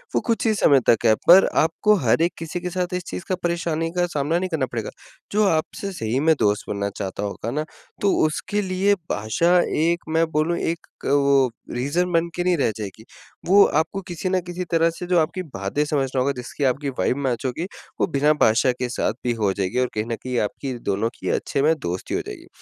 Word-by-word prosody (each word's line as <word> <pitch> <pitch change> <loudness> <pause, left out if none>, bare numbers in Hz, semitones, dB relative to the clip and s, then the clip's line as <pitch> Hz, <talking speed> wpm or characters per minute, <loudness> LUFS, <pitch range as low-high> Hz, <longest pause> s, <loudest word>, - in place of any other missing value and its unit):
वो - - +3
कुछ 230 0 0
ही 220 - +3
समय 145 -9 +4
तक 120 - +3
है। 110 - +6
पर 185 +3 +9 0.2
आपको 190 +7 +3
हर 115 +7 +3
एक 170 +1 +2
किसी 165 +2 -5
के 180 - -3
साथ 180 0 -2
इस 180 0 -2
चीज़ - - -5
का, 185 - +2
परेशानी 165 -1 -1
का 175 0 +1
सामना 155 0 0
नहीं 185 +1 -2
करना 155 -6 0
पड़ेगा, 115 -3 -3 0.4
जो 210 +1 +2
आपसे 165 +4 -1
सही 115 - -2
में 160 +3 +4
दोस्त 105 0 +1
बनना 100 0 -2
चाहता 100 0 -4
होगा 105 +3 -4
ना, 150 +4 -2 0.4
तो 200 - +3
उसके 190 +6 -1
लिए 190 +1 +1 0.2
भाषा 170 - +2 0.2
एक 170 +2 +1
मैं 165 +1 +3
बोलूँ, 155 +3 +1
एक 165 0 -3 0.2
अ, - - -1
वो 140 -2 +4 0.2
रीज़न 145 +9 -1
बन 165 0 +2
के 175 - -1
नहीं 180 -1 +2
रह 135 - +1
जाएगी। 105 0 -7 0.4
वो 200 +3 +7 0.2
आपको 195 +5 -2
किसी 175 +1 -3
ना 185 0 +2
किसी 175 +1 -4
तरह 165 0 +3
से 170 +2 -7
जो 180 -1 +3
आपकी 165 +4 -1
बातें 130 - -2
समझ 145 -2 0
रहा - - +2
होगा, 135 +2 +2
जिसकी 125 +3 -5
आपकी 140 +2 +1
वाइब 130 - +1
मैच 130 -3 -2
होगी, 130 +7 -2 0.4
वो - - +3
बिना 150 -2 +2
भाषा 115 +4 +4
के 125 0 -4
साथ 120 - -1
भी 120 - +1
हो 105 -4 0
जाएगी 95 +5 -1
और 125 - +2
कहीं 105 - -1
न 115 - -3
कहीं 125 +1 -4
आपकी 130 +5 -3 0.2
दोनों 100 +3 0
की - - -3
अच्छे 140 - -1
में 155 +3 +4
दोस्ती 90 -5 -4
हो - - 0
जाएगी। - - -9
155 Hz, 225 wpm, -23 LUFS, 125-175 Hz, 0.4 s, पर